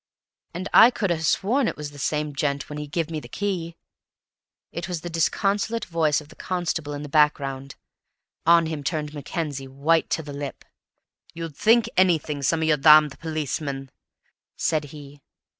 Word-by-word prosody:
"And 185 +2 -4
I 225 - +9
could 205 -6 -2
ha' 165 -2 -1
sworn 225 - +1
it - - -3
was 150 -1 -6
the 145 - -12
same 150 +1 -1
gent 140 0 -1
when 150 0 -6
he 150 - -5
give 165 +2 -2
me 155 - -2
the - - -11
key!" 180 -5 -3 1.0
It 170 +1 -5
was 175 -3 -4
the 175 - -6
disconsolate 200 +7 0
voice 160 -4 +1
of 150 -1 -14
the - - -15
constable 165 -5 -3
in 145 - -6
the - - -6
background; 140 -2 +1 0.7
on 170 0 +5
him 155 -2 -4
turned 150 0 -3
Mackenzie, 145 -2 -4
white 145 +5 +1
to 160 - -1
the 145 -1 -8
lips. 140 -1 -6 0.7
"You'd 165 -3 -6
think 225 +6 +4
anything, 160 -6 +2
some 160 +4 +1
of - - +1
you 155 -1 +3
damned 150 0 +6
policemen," 145 -3 -4 0.7
said 155 -2 0
he. 145 -1 -12
155 Hz, 175 wpm, -24 LUFS, 145-170 Hz, 1.0 s, I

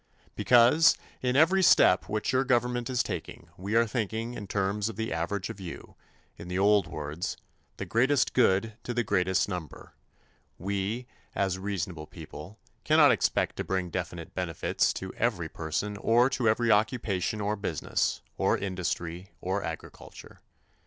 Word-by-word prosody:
Because, 125 +7 +5 0.2
in 125 0 0
every 165 +7 +5
step 95 - +5
which 105 0 -1
your 130 +1 +3
government 120 -1 0
is 125 -1 +1
taking 85 - -6
we 100 +5 -4
are 115 0 +5
thinking 115 0 -3
in 105 -4 -7
terms 100 +2 -1
of 115 - -7
the 110 -2 -3
average 90 +4 -2
of - - -11
you 90 -3 -8 0.4
in 85 - -9
the 90 +1 -3
old 100 -1 +4
words, 75 +2 -5 0.4
"the - - -4
greatest 130 +5 +2
good 110 -2 +3
to 120 - -5
the 120 - +1
greatest 95 -2 +1
number" 90 -5 -7 0.6
we, 100 +6 -2 0.3
as 95 -2 0
reasonable 90 -5 -4
people, 85 +9 -10 0.3
cannot - - +6
expect - - 0
to - - -2
bring 95 -2 -2
definite - - -5
benefits - - 0
to 95 0 -6
every 100 -9 -1
person 85 +7 -3
or 120 +5 +3
to 125 -4 +1
every 115 +1 +2
occupation 105 -1 +1
or 105 +1 -1
business, 100 -7 -2 0.2
or - - +2
industry 90 -1 -4
or 95 +2 -2
agriculture. 80 - -9
100 Hz, 150 wpm, -28 LUFS, 90-115 Hz, 0.6 s, cannot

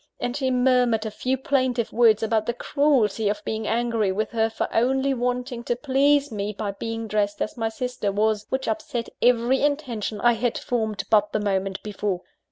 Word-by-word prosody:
and 245 - -2
she 270 -2 0
murmured 250 -3 +2
a 220 - -3
few 255 +5 -1
plaintive 255 -3 0
words 225 -2 +4
about 220 -1 0
the 240 - -1
cruelty 240 -8 +1
of 210 - -3
being 220 0 -3
angry 230 -4 +1
with 210 +3 -2
her 225 -1 +1
for 225 - -2
only 265 +4 +2
wanting 250 0 -2
to 240 - -1
please 280 +2 +2
me 205 -1 -3
by 205 0 -3
being 225 +2 -5
dressed 205 -1 0
as - - -3
my 225 -2 -1
sister 235 -3 -3
was, 210 +1 0
which 265 0 -2
upset 305 -7 -3
every 245 +2 +3
intention 255 -8 -1
I 240 +2 +4
had 235 +1 -1
formed 220 -4 -2
but 210 -1 +3
the - - +1
moment 195 -1 -1
before. 205 -3 -3
230 Hz, 185 wpm, -24 LUFS, 215-255 Hz, -, words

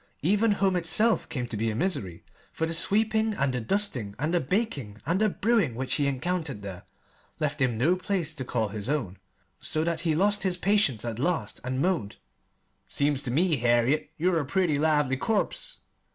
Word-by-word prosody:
Even 205 +6 +3
home 195 -2 +1
itself 180 +7 +2
came 125 -4 -3
to 120 - -5
be 110 +2 0
a 110 - -3
misery, 105 - -1 0.3
for 160 - -2
the 165 - -3
sweeping 220 +5 +1
and 140 -5 0
the 125 - -2
dusting 125 - -1
and 155 +5 -1
the 175 - +3
baking 145 - -2
and 175 +7 +1
the 215 - +4
brewing 205 - +1
which 130 +2 -1
he 145 - +2
encountered 140 - -2
there 95 -3 -7 0.6
left 150 -2 -1
him 125 -4 +1
no 155 +10 +3
place 180 -4 -2
to 145 -5 -4
call 115 -4 -1
his 105 +3 -5
own, 115 -11 -2 0.4
so 155 - -1
that 165 -1 -1
he 165 -2 0
lost 205 +4 +2
his 185 -2 0
patience 185 - +2
at 115 -1 -4
last 170 +5 -1
and 130 +2 -1
moaned: 170 - 0 0.7
"Seems 145 -1 0
ter 130 - -4
me, 160 +5 +2
Harriet, 120 +5 +2
you're 175 +1 +2
a 145 - -2
pretty 160 -2 +1
lively 150 -3 +2
corpse!" 225 - -2
155 Hz, 190 wpm, -27 LUFS, 125-185 Hz, 0.7 s, the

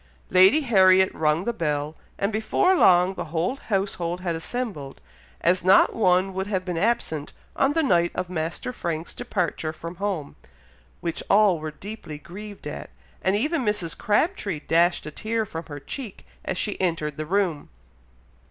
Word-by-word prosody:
Lady 190 +12 +6
Harriet 190 -7 +5
rung 155 +2 +1
the 235 - 0
bell, 150 -5 -2 0.2
and 200 +2 -1
before 220 - +2
long 180 - +5
the - - -5
whole 170 - -1
household 190 -6 -2
had 175 -2 -1
assembled, 165 - -5 0.4
as 180 +1 +2
not 190 +1 +5
one 190 -2 +2
would 190 +1 -3
have 190 -3 -2
been 180 -2 -3
absent 165 -6 -1 0.2
on 275 +2 +2
the 325 0 +2
night 175 - +3
of 185 0 -2
Master 170 +7 -3
Frank's 170 -6 -4
departure 180 -9 -2
from 170 +2 -8
home, 190 -7 -3 0.7
which 170 -1 -3
all 200 -4 +5
were 155 0 -4
deeply 170 -1 -8
grieved 200 +6 -10
at, 150 - -6 0.3
and 190 +1 +2
even 300 +8 0
Mrs. 210 -7 0
Crabtree 210 - 0
dashed 170 +2 +2
a 155 - -6
tear 220 +7 -2
from 165 -4 -7
her 145 -2 -7
cheek 225 - -8 0.2
as - - -3
she 205 0 -1
entered 160 -5 -1
the 155 - -3
room. 180 -5 0
185 Hz, 160 wpm, -24 LUFS, 165-210 Hz, 0.7 s, Lady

